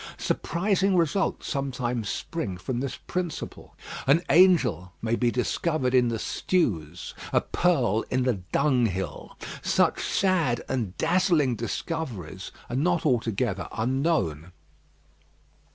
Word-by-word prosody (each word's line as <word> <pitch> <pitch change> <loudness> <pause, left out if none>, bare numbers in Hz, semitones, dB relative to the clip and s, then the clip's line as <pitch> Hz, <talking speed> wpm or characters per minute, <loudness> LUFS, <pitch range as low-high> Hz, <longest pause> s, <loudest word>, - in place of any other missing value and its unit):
Surprising 195 +2 +1
results 175 +3 +1
sometimes 125 -6 -2
spring 105 - -3
from 120 +7 -3
this 135 0 -3
principle. 180 -3 -5 0.3
An 155 +6 +5
angel 165 - +4
may 115 +1 0
be 120 0 +2
discovered 130 +2 0
in 125 -1 +5
the 115 -1 -1
stews; 90 - -1 0.2
a - - +4
pearl 125 - +1
in 130 0 +1
the 120 -7 0
dunghill. 115 - 0 0.2
Such - - +2
sad 170 - +1
and 110 -8 -2
dazzling 165 -5 +2
discoveries 115 - -4 0.2
are 120 - -4
not 170 +5 +1
altogether 115 - 0
unknown. 115 - 0
125 Hz, 110 wpm, -26 LUFS, 110-165 Hz, 0.3 s, An